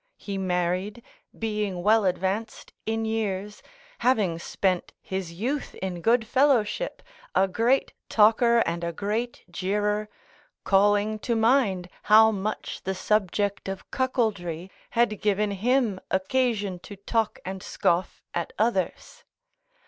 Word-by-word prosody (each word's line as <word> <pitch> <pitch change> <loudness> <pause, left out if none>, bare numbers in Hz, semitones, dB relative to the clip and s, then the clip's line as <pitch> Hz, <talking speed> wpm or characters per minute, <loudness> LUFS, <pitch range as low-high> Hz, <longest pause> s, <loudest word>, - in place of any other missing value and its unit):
He 200 - -6
married, 185 +3 -1 0.3
being 210 -5 -2
well 215 +1 +4
advanced 190 +4 -2
in 225 0 0
years, 210 -2 -2 0.4
having 205 -10 +2
spent 185 +1 -1
his 190 -3 -4
youth 245 +12 -3
in 180 -2 -4
good 230 +4 +3
fellowship, 260 - +1 0.3
a 195 - +4
great 235 +7 +1 0.2
talker 230 +2 +5
and 170 +1 -2
a 170 - -1
great 215 +7 -3
jeerer, 210 +3 -1 0.6
calling 205 +2 +3
to 235 +2 -1
mind 220 -6 +2 0.2
how 220 +1 +8
much 210 +1 -4
the 190 0 -2
subject 200 0 0
of 195 0 -7
cuckoldry 200 -9 -1 0.3
had 235 -3 +2
given 210 0 +1
him 225 0 +1
occasion 205 -1 0
to 205 +3 -10
talk 220 +3 -1
and 190 0 -5
scoff 175 +1 -1
at 170 - -3
others. 230 - -1
210 Hz, 120 wpm, -26 LUFS, 190-225 Hz, 0.6 s, how